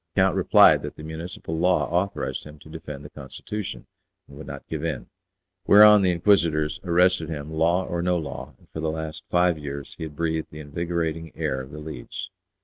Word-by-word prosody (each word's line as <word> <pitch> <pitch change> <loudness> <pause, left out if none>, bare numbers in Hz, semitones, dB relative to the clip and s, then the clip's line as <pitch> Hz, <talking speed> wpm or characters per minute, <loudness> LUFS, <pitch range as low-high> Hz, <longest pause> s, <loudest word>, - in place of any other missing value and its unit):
The - - +4
count - - +3
replied - - +6
that - - -6
the 75 - -10
municipal 80 +1 -6
law 90 +2 +2
authorized 95 +4 -1
him 75 0 -12
to - - -14
defend 75 -1 -8
the - - -10
constitution, 75 - -7 0.4
and 70 - -14
would 80 - -10
not 70 0 -8
give 80 -1 -4
in; 80 -5 -4 0.6
whereon 105 0 +9
the 95 - +3
Inquisitors 85 -4 +2
arrested 90 -2 +3
him, 75 0 -5
law 85 +4 +2
or 85 0 -2
no 90 0 +1
law, 70 -3 -6
and - - -25
for - - -6
the 80 0 -1
last 80 0 -5
five 90 -2 +2
years 70 -1 -6
he - - -4
had 75 -2 -9
breathed 80 0 -1
the 75 - -10
invigorating 80 +1 -3
air 65 - -2
of 65 - -10
The 75 - -9
Leads. 75 +5 -7
80 Hz, 200 wpm, -25 LUFS, 75-90 Hz, 0.6 s, whereon